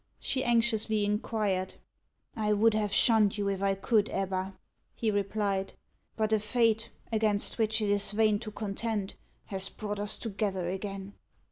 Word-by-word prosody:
she 260 -1 -1
anxiously 230 -3 +2
inquired. 205 -3 -1 0.6
"I 210 -1 +1
would 220 +2 +4
have 210 -1 0
shunned 215 -2 +4
you, 200 -1 -1
if 195 -1 -2
I 195 0 +2
could, 210 +1 +2
Ebba," 190 0 -2 0.4
he 225 -2 0
replied; 200 -1 -1 0.4
"but 220 0 0
a 215 - +4
fate, 225 +1 +1 0.2
against 215 0 +1
which 220 0 +2
it 205 - 0
is 205 0 +1
vain 210 0 +2
to 220 - -6
contend, 210 0 -3 0.3
has 195 -1 -2
brought 205 -1 -5
us 205 0 0
together 200 -5 -2
again." 195 +1 -5
210 Hz, 150 wpm, -30 LUFS, 195-220 Hz, 0.6 s, would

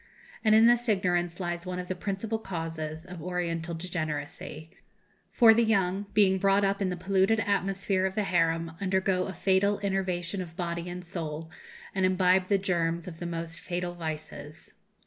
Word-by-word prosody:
And 215 -1 +5
in 220 +1 +7
this 240 0 +4
ignorance 175 -3 +1
lies 175 -1 -3
one 180 0 -3
of 180 0 -5
the 185 - -1
principal 205 +4 -3
causes 165 -4 -5
of 180 -3 -9
Oriental 170 -1 -2
degeneracy; 155 -2 -5 0.6
for 230 -2 +7
the 235 +1 +3
young, 200 -2 +1
being 190 -2 +5
brought 195 +1 +3
up 195 +1 +1
in 190 - +1
the 180 - -3
polluted 190 +4 +2
atmosphere 195 -2 0
of 190 - -6
the 215 - +1
harem, 165 -3 +1
undergo 190 -1 +1
a 190 - -5
fatal 195 +3 +2
enervation 190 -1 -1
of 165 -2 -8
body 170 0 -3
and 180 0 -7
soul, 160 -2 -5 0.4
and 190 - 0
imbibe 185 0 +3
the 200 - +3
germs 170 -2 -1
of 165 -2 -8
the 175 - -4
most 165 -1 -5
fatal 175 0 -3
vices. 155 -2 -7
180 Hz, 170 wpm, -28 LUFS, 170-195 Hz, 0.6 s, in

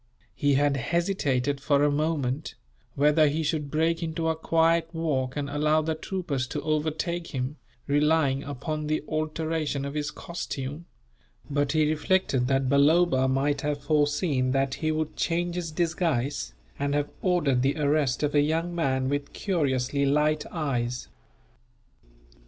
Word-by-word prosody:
He 145 -1 +2
had 145 0 +2
hesitated, 145 -4 0
for 140 0 +3
a 145 - +3
moment, 150 -2 -1 0.4
whether 150 +2 +4
he 155 +3 0
should 150 -2 -1
break 165 +3 +1
into 160 0 -1
a 160 - +1
quiet 165 +1 +2
walk 135 -6 -1
and 145 -1 -2
allow 150 +2 +2
the 160 +1 0
troopers 155 -6 -3
to 145 - -4
overtake 155 +2 -1
him, 130 +4 -3 0.3
relying 145 -1 +2
upon 150 +2 -4
the 155 0 0
alteration 155 -2 -2
of 140 - -4
his 150 -1 -2
costume; 150 -3 -6 0.7
but 145 0 +1
he 155 -1 +3
reflected 155 -4 +1
that 135 0 +1
Balloba 140 0 +4
might 135 +2 +1
have 145 -1 -2
foreseen 145 -3 +1
that 135 0 +1
he 155 +2 -1
would 155 0 -2
change 175 +1 0
his 175 -2 -3
disguise, 155 - -1 0.2
and 140 0 0
have 145 0 -1
ordered 160 -9 +2
the 135 +4 +1
arrest 145 -3 +1
of 150 - 0
a 145 - +5
young 165 +4 0
man 130 -6 0
with 145 +1 -2
curiously 140 -7 0
light 150 +2 +2
eyes. 125 -7 -2
150 Hz, 145 wpm, -27 LUFS, 140-160 Hz, 0.7 s, a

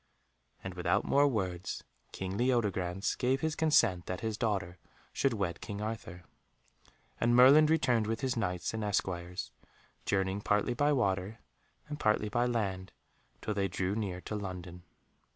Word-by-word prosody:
And 95 - -5
without 90 +3 0
more 145 +1 +4
words 95 -8 -2 0.3
King 95 0 -4
Leodegrance 100 -6 0
gave 130 +1 +1
his 160 0 -1
consent 120 - +3
that 90 - -4
his 110 -1 -2
daughter 95 -5 -2 0.3
should 135 -3 +1
wed 95 -6 -2
King 100 -1 -5
Arthur. 105 -5 -5 1.0
And 120 +1 +3
Merlin 140 +5 +8
returned 125 -9 +2
with 115 0 -2
his 130 -3 0
Knights 90 -6 -2
and 110 -1 -3
esquires, 90 -3 -2 0.6
journeying 95 0 0
partly 105 +4 +1
by 145 +4 +2
water 100 -5 0 0.5
and 150 0 -6
partly 105 -3 +2
by 120 +3 +1
land, 95 -6 -2 0.5
till 105 - -1
they 100 -1 0
drew 95 +1 -2
near 100 -5 -3
to 105 - -5
London. 90 -3 -6
105 Hz, 150 wpm, -31 LUFS, 95-120 Hz, 1.0 s, Merlin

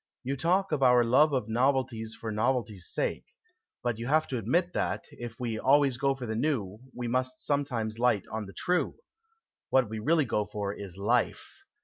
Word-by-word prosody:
" - - -64
You 135 +2 -2
talk 180 +6 +1
of 150 -3 0
our 125 -2 +6
love 135 +6 +4
of 130 -6 -1
novelties 120 -2 0
for 110 - -4
novelty's 110 -4 -1
sake. - - -2 0.6
But 120 -2 -1
you 115 - -4
have 155 +3 +3
admitted 135 - 0
that, - - -1
if 120 -2 -8
we 115 -3 -2
always 135 -1 +4
go 135 +1 +1
for 130 -2 -6
the 110 -1 -3
new, 110 -7 -1 0.2
we 120 -1 -3
must 130 +1 -1
sometimes 120 -7 -1
light 120 -6 +3
on 110 -2 -4
the 95 - -11
true. 180 0 0 0.7
What 130 -5 +3
we 110 0 -4
really 155 +6 +2
go 105 -3 0
for 105 -1 -4
is 100 -3 -8
life. 125 - -1
125 Hz, 190 wpm, -29 LUFS, 110-140 Hz, 0.7 s, our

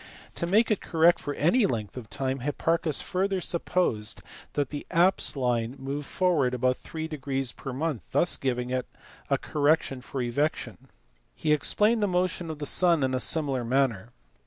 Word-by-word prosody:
To 170 - -3
make 220 +6 +3
it 210 - +1
correct 165 +1 +3
for 145 -1 -4
any 200 - +3
length 110 - -4
of 120 -5 -8
time 135 0 -2
Hipparchus 155 +3 0
further 190 +1 -1
supposed 170 -11 -1 0.3
that 145 -1 -1
the 145 - -6
apse 180 0 +3
line 120 -2 -1
moved 140 +2 -5
forward 155 -9 +1
about 130 +1 +1
3 160 0 -6 0.6
a 135 - -2
month, 140 - -3
thus 175 - +3
giving 125 -1 -2
a 130 -1 -4
correction 145 -3 +1
for 135 - -6
evection. 145 +6 -1 0.6
He 155 -1 +1
explained 210 +9 +2
the 205 - +2
motion 180 -2 -1
of 160 - -5
the 145 - -4
sun 170 0 +4
in 130 0 0
a 130 - +1
similar 135 -2 0
manner. 120 -4 0
145 Hz, 160 wpm, -27 LUFS, 130-170 Hz, 0.6 s, sun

